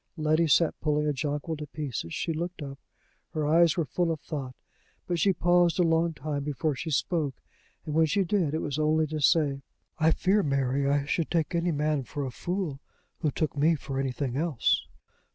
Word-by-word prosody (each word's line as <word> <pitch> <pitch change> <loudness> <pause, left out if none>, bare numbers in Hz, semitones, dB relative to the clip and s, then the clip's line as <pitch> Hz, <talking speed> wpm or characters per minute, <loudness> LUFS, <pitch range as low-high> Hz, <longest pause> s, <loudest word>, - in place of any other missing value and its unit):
Letty 155 +1 +2
sat 160 +2 +4
pulling 150 0 +1
a 150 - +1
jonquil 145 +3 -3
to 150 0 -6
pieces. 135 - -5
She 165 - -2
looked 170 0 -4
up. 140 0 -8 0.6
Her 155 -1 0
eyes 165 +3 +4
were 165 - +1
full 170 +5 0
of 160 - -3
thought, 135 -4 -6 0.5
but 175 -1 -1
she 195 - +4
paused 175 -1 +3
a 180 - +4
long 165 0 +2
time 145 0 -3
before 150 +1 -1
she 150 +5 -5
spoke, 150 -2 0 0.5
and, 155 - -4
when 160 +1 +4
she 195 +6 +2
did, 170 -5 0
it 160 - -2
was 145 0 -2
only 155 +1 +3
to 155 0 -4
say: 140 -1 +3 0.4
"I 160 0 +4
fear, 195 +5 +2
Mary, 140 -2 +1
I 140 0 +1
should 160 +2 -1
take 165 -1 0
any 170 +1 +1
man 150 -1 0
for 140 +3 -5
a 130 - -4
fool 175 -1 -3 0.4
who 155 - +1
took 150 +1 -2
me 155 +4 +3
for 135 -2 -4
anything 135 -1 -2
else." 155 -6 +1
155 Hz, 200 wpm, -28 LUFS, 140-165 Hz, 0.6 s, sat